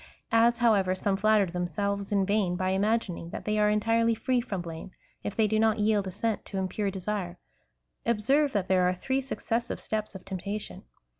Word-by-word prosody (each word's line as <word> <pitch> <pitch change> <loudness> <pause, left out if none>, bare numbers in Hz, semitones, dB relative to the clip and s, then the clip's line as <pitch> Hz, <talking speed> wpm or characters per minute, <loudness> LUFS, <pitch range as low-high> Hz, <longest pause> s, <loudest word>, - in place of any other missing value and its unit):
As, 235 +1 +4
however, 205 -6 +3
some 195 +1 0
flatter 215 +1 +4
themselves 195 +3 -2
in 200 -2 +2
vain, 200 -3 +1
by 185 +1 -1
imagining 195 -3 0
that - - -7
they 215 0 +1
are 210 0 +4
entirely 230 +2 +2
free 255 +2 +1
from 200 -5 -4
blame, 170 +1 -7 0.3
if 205 - -4
they 220 - +3
do 215 +1 +1
not 220 0 +3
yield 210 -2 +2
assent 205 +4 -2
to 195 - -6
impure 190 +2 -1
desire, 190 -2 -4 0.7
observe 265 +6 +2
that 200 -3 0
there 185 -1 +3
are 180 - -1
three 265 +8 -1
succes 235 -3 -2
sive - - -4
steps 215 -2 -3
of 190 - -9
temptation. 195 +2 -5
205 Hz, 190 wpm, -28 LUFS, 190-225 Hz, 0.7 s, As